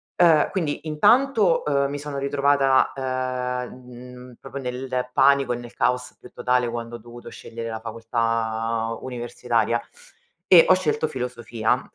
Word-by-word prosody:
Ehm, 165 -3 +5
quindi 160 -4 -3
intanto, 215 - +3
ehm, 140 -1 +1
mi 145 - -4
sono 145 -1 -6
ritrovata, 140 -1 +2
ehm, 130 -1 -3
mhmm, 125 0 -12
proprio 140 -1 -7
nel 125 0 -3
panico 135 -1 +4
e - - -3
nel 120 -1 -10
caos 125 0 -1
più 125 - -14
totale 125 -1 0
quando 120 0 -5
ho - - -6
dovuto 120 +2 -12
scegliere 115 0 -8
la 110 0 -5
facoltà 115 0 -2
universitaria 120 -2 -1 0.7
e 175 -3 +8
ho 185 - +7
scelto 155 -3 0
filosofia, 125 -3 -2
125 Hz, 140 wpm, -23 LUFS, 120-140 Hz, 0.7 s, e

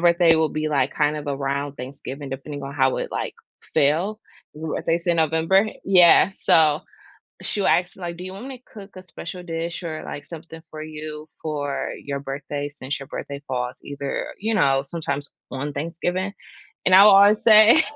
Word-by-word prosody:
birthday 170 -1 +5
will 160 -1 +2
be, 155 0 -2
like, 140 -2 +1
kind 150 0 +1
of 145 - -8
around 140 0 -2
Thanksgiving, 135 +1 -7
depending 140 +2 -6
on 135 - -6
how 130 -2 +2
it, - - -3
like, - - -3 0.4
fell 175 +10 +2 0.4
ooh, 160 0 -4
if - - -6
they 165 - +3
say 175 0 0
November 165 +5 +3 0.2
Yeah, 180 0 +6
so 155 -2 +4 0.6
,she 205 - -2
will - - +2
ask 180 +1 +2
me, 190 - -15
like, 170 0 -5
"Do 180 - -8
you 185 - -7
want 205 +7 -8
me 265 -2 -7
to - - -41
cook 200 -2 -11
a 185 - -10
special 180 0 -8
dish 170 +1 -4
or, 160 -2 -5
like, 145 - -7
something 165 0 -10
for 155 0 -7
you 155 0 -8
for 145 -3 -3
your 140 -1 -3
birthday 145 +1 -5
since 145 -1 -5
your 140 - -9
birthday 140 0 -6
falls 125 -1 -3
either, 140 -1 -4
you 220 +3 -1
know, 135 -10 +3
sometimes 145 -1 -4 0.2
on 140 +2 -3
Thanksgiving?" 175 +5 -3 0.5
And 185 - +5
I 195 +2 +10
will 210 - +8
always 200 +2 +6
say 220 +6 +8
155 Hz, 195 wpm, -23 LUFS, 140-180 Hz, 0.6 s, I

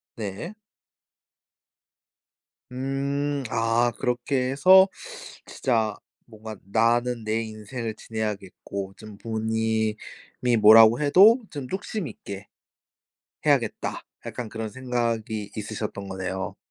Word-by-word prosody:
네. 110 - -5 2.2
음. 140 +2 -2
아 115 +1 +2
그렇게 125 +1 -1
해서 185 +8 +7 0.6
진짜 110 -4 0 0.3
뭔가 110 -1 -9 0.2
'나는 120 +2 +2
내 110 +1 0
인생을 110 +1 -6
지내야겠고 100 -3 -5
좀 110 -2 -11
부모님이 110 -1 -1 0.6
뭐라고 110 +3 +8
해도 195 - +6
좀 145 -4 -6
뚝심 195 +2 -4
있게 100 -3 -9 1.0
해야겠다.' - - 0 0.2
약간 120 -2 -5
그런 110 0 -5
생각이 115 -3 -2
있으셨던 105 -2 -5
거네요. 95 0 -4
115 Hz, 200 characters per minute, -25 LUFS, 110-130 Hz, 2.2 s, 뭐라고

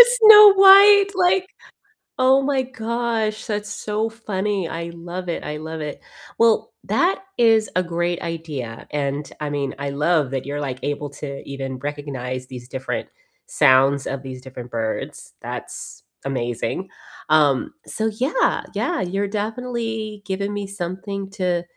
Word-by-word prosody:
Snow 425 -3 +10
White, 395 +1 +8
like, 370 0 +2 0.7
oh 260 +1 +4
my 270 -1 +1
gosh, 230 -3 -2
that's 210 -1 -3
so 215 +1 -2
funny, 205 -4 -2
I 170 +1 -5
love 175 +2 -7
it, 170 - -3
I 150 - -4
love 160 +1 -6
it. 150 -1 -6 0.4
Well, 230 -1 +3
that 365 +3 +1 0.2
is 225 -2 +4
a 185 - +2
great 175 0 -2
idea, 150 -9 -6
and 145 0 -2
I 150 - -3
mean, 140 -2 -2
I 140 0 -3
love 150 -1 +1
that 135 -1 -3
you're 145 +1 -4
like 130 -3 -4
able 145 0 -3
to 140 -1 -7
even 135 -2 -5
recognize 130 -3 -5
these 125 -2 -9
different 130 0 -4 0.4
sounds 135 0 +4
of 135 -1 -4
these 130 -1 -8
different 125 -2 -9
birds, 115 -1 -4
that's - - -7 0.2
amazing. 120 +6 -3 0.4
Um, 150 -4 +3
so 220 - -2
yeah, 320 - +1
yeah, 350 -2 -1
you're 195 +3 -1
definitely 220 -1 -4
giving 200 +1 -3
me 205 -1 -4
something 195 +1 -5
to 180 -3 -1
175 Hz, 145 wpm, -22 LUFS, 140-225 Hz, 0.7 s, Snow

